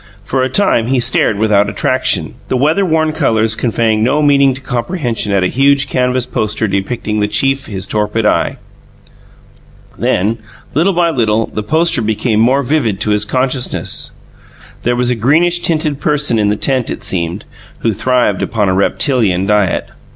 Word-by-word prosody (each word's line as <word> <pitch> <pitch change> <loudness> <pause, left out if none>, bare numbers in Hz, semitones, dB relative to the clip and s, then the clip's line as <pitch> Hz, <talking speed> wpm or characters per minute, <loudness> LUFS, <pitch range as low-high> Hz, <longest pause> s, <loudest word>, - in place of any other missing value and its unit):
For 130 - -1
a 130 - 0
time 130 - +1
he 130 0 +1
stared 110 -3 +2
without 105 -1 +2
attraction; 100 - 0
the 130 - 0
weather 155 +9 +2
worn 160 -3 +1
colours 115 -8 +1
conveying 110 -2 0
no 145 +6 +1
meaning 140 -2 +3
to 135 - -10
comprehension 120 - -3
at 100 -2 +2
a - - +2
huge 140 +4 +2
canvas 125 -1 0
poster 110 +1 -2
depicting 105 +2 -2
the 105 - +1
chief 135 +5 0
his 95 -3 -4
torpid 105 +1 -1
eye. 105 - +1 1.4
Then, 105 +5 0 0.3
little 170 +7 +2
by 170 -1 +2
little, 115 -5 +1
the 105 - -2
poster 160 +3 +1
became 110 0 0
more 130 +5 +3
vivid 120 -8 0
to 105 - +1
his 105 0 +1
consciousness. 130 +2 -2 0.7
There 120 +1 0
was 125 0 +1
a - - 0
greenish 160 +10 +2
tinted 155 -4 0
person 145 -7 0
in 105 -1 +2
the 105 - +1
tent, 130 -1 0
it - - -5
seemed, 85 +2 -2 0.4
who 115 - 0
thrived 120 -2 0
upon 105 -4 0
a - - +1
reptilian 100 -1 +1
diet. 105 -2 +1
120 Hz, 165 wpm, -14 LUFS, 105-140 Hz, 1.4 s, meaning